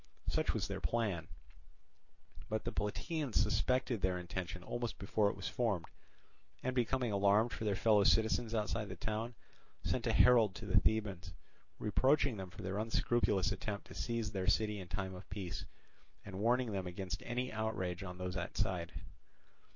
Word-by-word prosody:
Such - - +1
was - - -1
their - - -4
plan. 100 -9 0 1.2
But 110 0 -1
the - - -2
Plataeans 140 - -2
suspected 125 -4 +2
their 95 -1 +1
intention 90 0 -5
almost 120 +4 -3
before 105 0 +2
it - - -4
was 95 -3 -5
formed, 100 -6 0 0.8
and 130 - 0
becoming 125 -1 +1
alarmed 100 +3 +4
for 110 - -4
their 105 -2 +2
fellow 105 0 +5
citizens 110 +2 +3
outside 110 -1 -1
the 95 - -5
town, 110 +2 -3 0.5
sent - - 0
a - - +3
herald 115 -6 +6
to - - -7
the - - +5
Thebans, 100 -5 0 0.4
reproaching 130 +3 +3
them 95 -1 -5
for - - -10
their 95 +2 -2
unscrupulous 110 -2 +2
attempt 100 +1 -3
to - - -9
seize 115 -2 -2
their 95 -3 -2
city 105 +1 +2
in 90 - -7
time 95 +1 -3
of 90 +2 -10
peace, 90 -3 -4 0.6
and 95 -1 -6
warning 120 +2 +2
them 95 -2 -2
against 90 +1 -4
any 125 +1 -2
outrage 105 -5 -2
on 90 -2 -6
those 90 0 -3
outside. 90 -1 -1
105 Hz, 165 wpm, -36 LUFS, 95-115 Hz, 1.2 s, herald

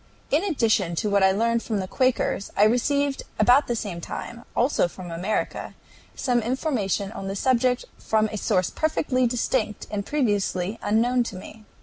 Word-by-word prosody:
In 300 +6 +3
addition 225 - +1
to 210 +5 -1
what 200 0 +3
I 190 - +6
learned 230 +3 +1
from 220 -3 -2
the 190 -1 -3
Quakers 255 -4 0
I 205 - +6
received 275 +5 +2 0.2
about 255 +4 +5
the 240 - 0
same 200 -7 -4
time, 235 +7 -7
also 245 -6 +2
from 175 0 -9
America, 180 +6 -3 0.4
some 245 -2 +1
information 225 - -1
on 195 - -6
the 195 - -3
subject 250 +2 +1
from 220 0 +1
a 215 - -4
source 185 -5 +1
perfectly 265 -5 +1
distinct 230 -2 -1
and 205 -1 -2
previously 205 -6 -1
unknown 240 +4 +2
to 210 - -6
me. 215 +3 -11
225 Hz, 165 wpm, -25 LUFS, 200-255 Hz, 0.4 s, I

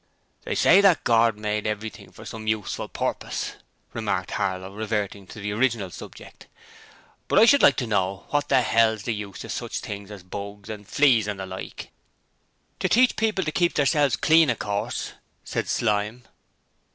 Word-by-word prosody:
'They - - -2
say 195 - +6
that 195 -5 +4
Gord 115 -2 +3
made 105 0 -2
everything 105 +1 -5
for - - -13
some 110 -1 -8
useful 110 -3 -2
purpose,' - - -3 0.4
remarked - - -2
Harlow, 95 -1 -2
reverting 105 -2 -3
to 110 - -10
the 105 0 -3
original 110 -4 0
subject, - - -12 0.8
'but - - +1
I 215 - +8
should 280 +4 +6
like 140 - +6
to 125 - -2
know 100 -3 -1
what 145 0 0
the 130 - +4
hell's 110 -2 +2
the 120 - -1
use 105 -2 -7
of - - -7
sich - - -4
things 100 -1 -6
as 100 -3 -10
bugs 100 +2 -7
and 105 -2 -9
fleas 125 -8 +3
and 105 -2 -4
the 95 - -4
like.' 95 0 -8 0.9
'To - - 0
teach 250 +2 +4
people 215 -3 0
to 155 - -1
keep 175 +1 +1
theirselves 145 -1 +3
clean, 160 -2 +4
of 120 - 0
course,' 100 -1 -3 0.3
said - - -3
Slyme. 105 +2 0
110 Hz, 175 wpm, -25 LUFS, 100-130 Hz, 0.9 s, I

